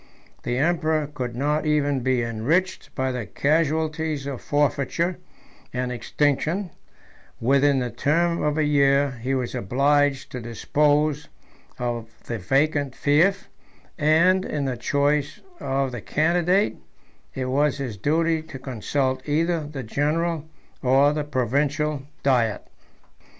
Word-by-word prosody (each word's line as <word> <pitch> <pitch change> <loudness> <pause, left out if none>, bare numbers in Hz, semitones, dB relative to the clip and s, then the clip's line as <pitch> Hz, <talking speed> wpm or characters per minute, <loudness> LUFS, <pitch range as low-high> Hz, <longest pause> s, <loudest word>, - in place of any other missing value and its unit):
The 120 0 -2
emperor 160 0 +1
could 130 -5 -5
not 150 +4 0
even 145 -2 +2
be 130 -1 +1
enriched 150 +12 -1
by 130 -1 0
the 125 -5 -4
casualties 155 - 0
of 140 -3 -5
forfeiture 145 +5 0 0.5
and 125 0 -2
extinction: 150 - 0 0.7
within 140 +3 +3
the 125 -2 -1
term 170 +8 +1
of 150 0 0
a 155 - +2
year, 140 -1 +3
he 135 +3 -1
was 125 -2 -2
obliged 140 +5 +1
to 125 - -5
dispose 145 +5 +1 0.5
of 120 -2 -3 0.2
the 115 -2 -4
vacant 140 +5 +1
fief; 170 +7 +2 0.5
and, 170 +5 +4
in 145 -5 -2
the 130 -2 -1
choice 145 +4 0 0.2
of 135 0 -1
the 120 -3 -6
candidate, 175 - +1 0.6
it 130 - -2
was 140 +3 +1
his 130 -6 -4
duty 160 - +1
to 155 -3 -9
consult 130 +1 -2
either 165 +1 +1
the 145 -3 -6
general 155 +6 -1 0.3
or 135 +3 +4
the 150 0 -1
provincial 145 +2 -1 0.2
diet. 120 -6 +1
145 Hz, 125 wpm, -24 LUFS, 130-155 Hz, 0.7 s, and